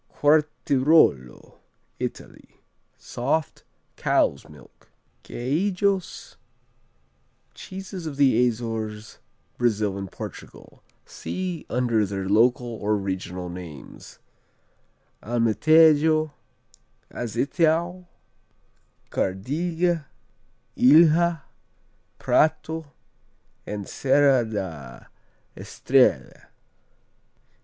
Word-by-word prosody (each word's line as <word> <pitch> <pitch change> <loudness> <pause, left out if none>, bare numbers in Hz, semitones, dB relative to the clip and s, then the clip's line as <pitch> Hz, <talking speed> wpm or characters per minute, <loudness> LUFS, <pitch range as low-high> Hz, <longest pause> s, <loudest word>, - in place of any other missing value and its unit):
Quartirolo 145 - +2 0.4
Italy - - -8 0.4
Soft, 140 +5 -3 0.3
cow's 70 - 0
milk. 75 -3 -18 0.3
Queijos 185 +8 -2 1.2
Cheeses 190 -2 -8
of 145 -3 -6
the 125 -4 +4
Azores, 110 -2 -5 0.4
Brazil 105 -5 0
and 95 -2 -7
Portugal - - -11 0.2
see 185 -3 -6
under 120 -3 +1
their 95 -1 -4
local 120 +5 +3
or 105 -3 -2
regional 95 -2 -5
names: 85 -5 -11 1.0
Alemtejo, 155 +7 +3 0.8
Azeitão, 165 - -1 1.0
Cardiga, 160 - -1 0.7
Ilha, 165 +3 +4 0.7
Prato 160 -1 0 0.8
and 105 -2 -5
Serra 135 -2 +3
da 80 - -7 0.5
Estrella. - - 0
130 Hz, 65 wpm, -24 LUFS, 105-160 Hz, 1.2 s, the